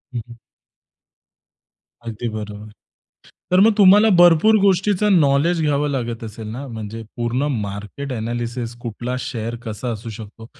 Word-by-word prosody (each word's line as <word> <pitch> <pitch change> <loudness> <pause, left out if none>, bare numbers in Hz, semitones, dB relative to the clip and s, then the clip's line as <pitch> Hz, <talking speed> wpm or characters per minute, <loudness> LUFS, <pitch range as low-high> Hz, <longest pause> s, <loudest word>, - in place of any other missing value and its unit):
हं, 115 - -2
हं. 120 - -12 1.7
अगदी 115 +1 -5
बरोबर. 105 0 -7 0.8
तर 180 +1 +4
मग 225 +2 +6
तुम्हाला 205 +3 +7
भरपूर 175 +5 +6
गोष्टींच 195 +1 +2
नॉलेज 160 +1 +3
घ्यावं 145 0 +1
लागत 120 -4 -3
असेल 110 0 -8
ना, 130 +6 -6
म्हणजे 110 0 -7
पूर्ण 120 +4 -1 0.2
मार्केट 105 +7 -6
एनालिसिस. 120 +1 -4
कुठला 120 +1 -5
शेअर 115 -1 -4
कसा 115 +1 -5
असू 110 +1 -7
शकतो. 110 +1 -10
120 Hz, 130 wpm, -20 LUFS, 110-150 Hz, 1.7 s, तुम्हाला